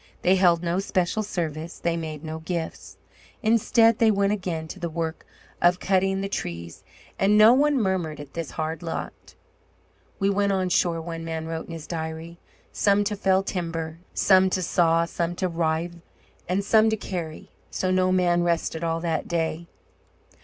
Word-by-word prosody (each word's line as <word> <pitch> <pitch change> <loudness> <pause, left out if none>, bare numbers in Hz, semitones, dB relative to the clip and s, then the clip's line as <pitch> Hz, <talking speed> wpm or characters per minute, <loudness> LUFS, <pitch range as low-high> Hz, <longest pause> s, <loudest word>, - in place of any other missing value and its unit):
They 185 +2 +5
held 175 -2 +3
no 175 +2 0
special 195 +1 0
service. 165 -5 -4
They 170 -1 -1
made 155 -2 -5
no 160 0 -5
gifts. 165 0 -5 0.5
Instead, 225 0 +4
they 225 - +5
went 200 -1 +2
again 175 -6 -3
to 190 - -8
the 170 -1 -3
work 165 0 -4 0.3
of 175 +1 +4
cutting 195 0 +1
the 195 - -2
trees, 85 - -5 0.4
and 205 +2 +4
no 215 +2 +8
one 285 +1 +3
murmured 185 -7 -1
at 145 -1 -10
his 165 -3 -4
hard 160 0 -2
lot. 165 -1 -6 0.8
"We 195 - +1
went 200 0 +2
on 185 -1 0
shore," 170 -2 +2
one 165 0 -6
man 160 -1 -4
wrote 160 0 -5
in 165 - -7
his 160 -2 -7
diary, 160 +1 -6 0.3
"some 200 0 +2
to 210 +1 -2
fell 195 -1 +2
timber, 165 -4 -4 0.2
some 190 -1 +5
to 185 0 -1
saw, 165 -1 +3
some 170 0 -3
to 185 - -1
rive, 170 0 -2 0.5
and 195 +2 0
some 220 +1 +5
to 220 - 0
carry; 170 -6 -6 0.2
so 185 - -1
no 185 0 +2
man 175 -2 +3
rested 170 -1 -1
all 165 0 -1
that 165 -2 -2
day." 165 0 -2
175 Hz, 175 wpm, -25 LUFS, 165-195 Hz, 0.8 s, no